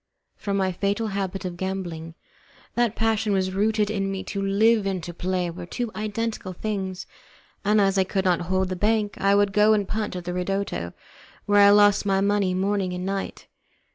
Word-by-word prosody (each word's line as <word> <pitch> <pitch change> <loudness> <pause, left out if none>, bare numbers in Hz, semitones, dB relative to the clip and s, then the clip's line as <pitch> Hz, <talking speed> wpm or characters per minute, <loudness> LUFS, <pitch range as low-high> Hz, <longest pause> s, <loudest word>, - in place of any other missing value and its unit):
From 200 -1 -2
my 190 -1 +1
fatal 200 +4 -1
habit 195 -1 -3
of 175 -1 -5
gambling. 175 -4 -4 0.6
That 240 -2 +1
passion 220 -2 +1
was 185 -1 0
rooted 210 +1 +1
in 195 -2 -1
me; 195 -1 -4
to 200 - -4
live 205 +2 +3
and 185 -3 -2
to 175 - -6
play 180 0 -2
were 175 0 -8
to 245 +6 -3
me 225 - -8
two - - -21
identical 215 -2 -3
things, 190 -2 -4 0.6
and 210 +1 +3
as 195 -1 +3
I - - +5
could 190 +1 -2
not 180 -2 +2
hold 190 0 +1
the 185 - -2
bank 210 +2 0
I 200 0 +3
would 200 -1 +2
go 210 +1 +5
and 205 -2 +1
punt 210 -2 -3
at 180 - -5
the 180 0 -4
ridotto, 180 - -2 0.5
where 205 0 +4
I 200 - +8
lost 205 0 +5
my 195 -1 +2
money 200 -2 +1
morning 195 -1 0
and 180 0 -4
night. 195 0 -4
195 Hz, 200 wpm, -24 LUFS, 185-210 Hz, 0.6 s, I